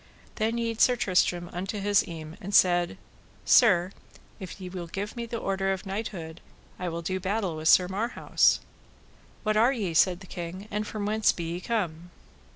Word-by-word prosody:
Then 225 +1 0
yede 230 -1 -2
Sir 250 - +5
Tristram 180 -4 +1
unto 195 +4 -4
his 205 0 +3
eme 160 -2 -8
and 200 +2 -3
said: 175 -2 +4 0.5
Sir, 185 -6 +5 0.5
if 190 0 -8
ye 185 - -7
will 180 -1 -6
give 200 +5 -5
me 235 -1 -5
the 230 - -4
order 195 -2 -1
of 190 -1 -4
knighthood, 190 -5 -5 0.4
I 180 -1 -2
will 170 0 -5
do 185 +2 -2
battle 190 -2 -1
with 155 0 -3
Sir 180 +2 +6
Marhaus. 215 +6 +1 0.8
What 215 -1 +1
are 235 +4 +5
ye, 205 -10 -2
said 180 +2 +3
the - - -10
king, 180 +3 -7
and 210 +1 -2
from 210 -2 -4
whence 215 +1 +3
be 170 - -6
ye 175 - -3
come? 175 -7 -3
190 Hz, 180 wpm, -27 LUFS, 175-215 Hz, 0.8 s, Sir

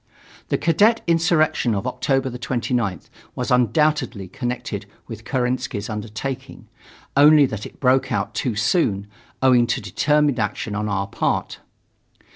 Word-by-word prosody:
The - - +1
cadet 205 +8 +3
insurrection 165 -8 +2
of 100 - -3
October 135 -1 0
29th 120 - -2 0.3
was 125 +1 -3
undoubtedly 125 - +1
connected 120 +5 -4 0.2
with 110 0 -9
Kerensky's 125 -4 -2
undertaking, 115 +4 -6 0.5
only 145 +1 +7
that 110 -5 -5
it - - -18
broke 130 0 +2
out - - -1
too 120 -4 -2
soon, 105 - +1 0.4
owing 125 -2 +5
to 120 - 0
determined 145 +6 +1
action 105 0 -2
on 105 +1 -2
our 100 -1 -1
part. 100 - -2
125 Hz, 125 wpm, -22 LUFS, 110-140 Hz, 0.5 s, only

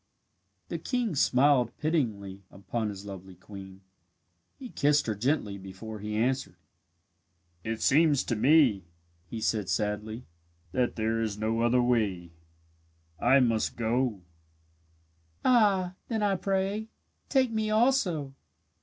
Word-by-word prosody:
The - - -3
king 240 - -1
smiled 130 -2 +3
pityingly 110 - -2
upon 110 +3 -4
his 100 0 -8
lovely 95 -2 -9
queen. 95 0 -11 0.8
He 255 - -9
kissed 145 -4 +2
her 110 - -1
gently 105 -2 -1
before 95 +3 -9
he 105 +1 -4
answered. 130 +4 0 1.1
"It 110 0 -3
seems 150 -1 +4
to 120 - -2
me," 125 - +4 0.4
he 115 - -6
said, 105 -3 -1
sadly, 105 +4 -2 0.5
"that 125 +3 0
there 115 0 0
is 110 -2 -2
no 110 +2 -1
other 120 +1 +3
way. 100 -8 0 0.9
I 135 0 +5
must 115 -3 +1
go." 115 -3 -1 1.2
"Ah, 200 -7 +3
then, 220 -3 -1
I 200 -1 +2
pray, 195 +3 -1 0.4
take 260 -4 +2
me 220 -1 -1
also. 215 - +1
120 Hz, 120 wpm, -28 LUFS, 105-160 Hz, 1.2 s, I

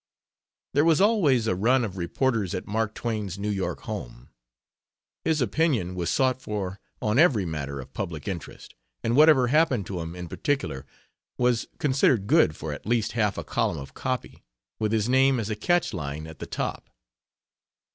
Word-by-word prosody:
There 145 - +4
was 165 -1 +4
always 185 - +4
a 110 - +1
run 120 +7 +2
of 95 -3 -6
reporters 100 +2 0
at 90 - -4
Mark 110 +1 -1
Twain's 105 -5 -3
New 105 +1 -2
York 95 -2 -2
home. - - -7 0.9
His 160 -3 +1
opinion 120 - +1
was 85 -2 -2
sought 130 +3 +1
for 100 -3 -4 0.2
on 110 +4 +2
every 130 - +4
matter 70 -4 -4
of 65 0 -10
public 85 -6 -5
interest, 90 -5 -7 0.3
and 115 +1 +1
whatever 145 -4 +6
happened 135 - +3
to 90 0 -4
him 85 +1 -5
in 90 -1 -6
particular 80 - -2 0.5
was 125 -2 +1
considered 130 -6 +2
good 145 - +4
for 75 -1 -5
at 75 - -9
least 115 -2 +1
half 105 -4 0
a - - -3
column - - -1
of 70 -1 -8
copy, 130 -2 -4 0.4
with 110 -1 0
his 110 -1 +1
name 130 0 +4
as 110 -1 -3
a - - -1
catch 175 +11 +1
line 75 +2 -4
at 80 -2 -11
the - - -6
top. - - -4
110 Hz, 175 wpm, -26 LUFS, 90-130 Hz, 0.9 s, whatever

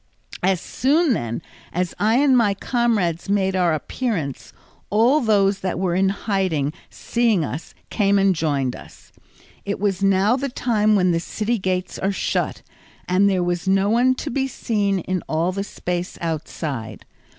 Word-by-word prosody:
As 185 -1 +2
soon, 290 - +2
then, 120 - -3 0.3
as 180 0 -2
I 220 +2 +3
and 270 0 +4
my 210 -5 +3
comrades 200 -7 0
made 190 -1 +1
our 180 -2 +2
appearance, 155 - -3 0.4
all 240 +8 +4
those 200 -4 +2
that 185 -3 -2
were 180 -1 0
in 190 +2 +2
hiding 190 -8 -1 0.2
seeing 230 -8 0
us 150 +3 -7 0.2
came 200 -2 +2
and 195 -1 +4
joined 145 -6 -1
us. - - -14 0.5
It 200 0 -3
was 195 -2 0
now 195 +4 +3
the 275 +1 -2
time 215 -4 +1
when 180 -2 +3
the 165 - +1
city 220 +6 -2
gates 185 -1 -2
are 195 - 0
shut, 195 - -2 0.4
and 190 +3 +3
there 185 -2 +1
was 175 +1 -2
no 195 +2 +3
one 250 +3 +3
to - - -5
be 270 +2 0
seen 205 -6 -1
in 185 +1 -2
all 165 +3 +1
the 195 +1 -3
space 180 -2 -4
outside. 145 - -4
195 Hz, 160 wpm, -22 LUFS, 175-220 Hz, 0.5 s, and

